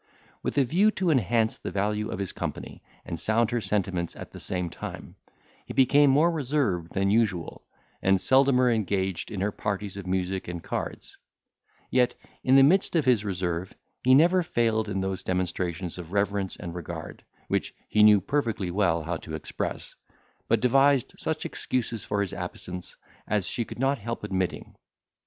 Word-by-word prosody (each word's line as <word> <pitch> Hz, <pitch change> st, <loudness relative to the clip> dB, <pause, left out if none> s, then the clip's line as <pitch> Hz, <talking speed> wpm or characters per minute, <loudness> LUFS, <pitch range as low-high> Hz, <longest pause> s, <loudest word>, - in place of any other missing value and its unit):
With -, -, -3 dB
a 140 Hz, -, +6 dB
view 180 Hz, -, +3 dB
to 185 Hz, -3 st, +2 dB
enhance 115 Hz, -, +1 dB
the -, -, -5 dB
value 105 Hz, +2 st, -1 dB
of -, -, -4 dB
his 100 Hz, -2 st, -3 dB
company, -, -, -6 dB, 0.2 s
and 85 Hz, -, -5 dB
sound 115 Hz, +1 st, +1 dB
her 120 Hz, -1 st, 0 dB
sentiments 95 Hz, -4 st, -1 dB
at -, -, -9 dB
the -, -, -10 dB
same 90 Hz, -2 st, -2 dB
time, -, -, -8 dB, 0.5 s
he -, -, -8 dB
became 140 Hz, +2 st, +5 dB
more 150 Hz, +6 st, +4 dB
reserved 130 Hz, -, -1 dB
than 100 Hz, 0 st, +1 dB
usual, 105 Hz, -7 st, 0 dB, 0.4 s
and 95 Hz, 0 st, +3 dB
seldomer 130 Hz, 0 st, +4 dB
engaged 95 Hz, -4 st, -1 dB
in 100 Hz, -, -4 dB
her 105 Hz, +2 st, +1 dB
parties 100 Hz, -1 st, -3 dB
of 100 Hz, -2 st, -7 dB
music 95 Hz, 0 st, -1 dB
and 85 Hz, -1 st, -5 dB
cards; -, -, -5 dB, 0.7 s
yet, 125 Hz, -1 st, +3 dB, 0.3 s
in 130 Hz, -, +4 dB
the 135 Hz, -, +8 dB
midst 180 Hz, +6 st, +3 dB
of 155 Hz, -5 st, +3 dB
his 120 Hz, -5 st, +4 dB
reserve, 90 Hz, -2 st, -3 dB, 0.3 s
he 130 Hz, +1 st, +6 dB
never 175 Hz, +5 st, +5 dB
failed 115 Hz, -10 st, 0 dB
in 95 Hz, -1 st, -1 dB
those 95 Hz, 0 st, -2 dB
demonstrations 90 Hz, -1 st, -2 dB
of 85 Hz, -1 st, -8 dB
reverence 100 Hz, -1 st, 0 dB
and 85 Hz, -, -7 dB
regard, 85 Hz, -2 st, -7 dB, 0.2 s
which -, -, -1 dB
he 105 Hz, -, +2 dB
knew 105 Hz, -1 st, +8 dB
perfectly 110 Hz, -5 st, -1 dB
well 85 Hz, -4 st, +1 dB
how 85 Hz, +1 st, -2 dB
to 80 Hz, 0 st, -7 dB
express, 80 Hz, -, -5 dB, 0.5 s
but -, -, +2 dB
devised 135 Hz, +1 st, +3 dB
such 160 Hz, -1 st, -2 dB
excuses 115 Hz, -3 st, -2 dB
for 100 Hz, 0 st, -1 dB
his 100 Hz, -3 st, -2 dB
absence, 90 Hz, -1 st, -6 dB, 0.3 s
as 105 Hz, -3 st, +1 dB
she 120 Hz, -, -1 dB
could -, -, -9 dB
not 135 Hz, +2 st, +1 dB
help 115 Hz, -1 st, -5 dB
admitting. 95 Hz, -3 st, -2 dB
105 Hz, 170 wpm, -27 LUFS, 95-130 Hz, 0.7 s, the